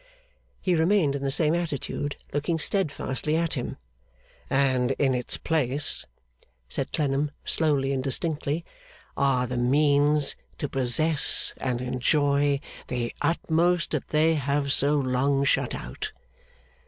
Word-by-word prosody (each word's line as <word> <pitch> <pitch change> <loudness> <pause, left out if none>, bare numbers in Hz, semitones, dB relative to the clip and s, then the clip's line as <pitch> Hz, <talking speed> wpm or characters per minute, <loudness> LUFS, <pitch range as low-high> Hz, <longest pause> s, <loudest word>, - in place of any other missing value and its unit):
He 185 - 0
remained 165 -3 +2
in 140 - -4
the 140 - -1
same 150 +3 +3
attitude, 145 -3 -3 0.2
looking 145 +3 0
steadfastly 155 -4 0
at 165 0 0
him. 125 -5 -4 0.7
'And 130 -2 +2
in 135 -2 +1
its 125 -1 -2
place,' 145 -3 0 0.6
said - - -3
Clennam, 145 0 0 0.2
slowly 140 -4 +1
and 130 -1 -2
distinctly, 150 +3 -1 0.5
'are 135 -2 +2
the 125 0 -4
means 145 +3 +3 0.2
to 145 - -3
possess 140 +4 +2
and 125 -2 -2
enjoy 140 +3 +1 0.3
the 120 -2 -3
utmost 170 +1 +1
that - - -2
they 155 +1 +3
have 140 -1 0
so 145 +2 +3
long 135 +1 +1
shut 140 - +1
out. 60 - -6
140 Hz, 125 wpm, -26 LUFS, 135-155 Hz, 0.7 s, same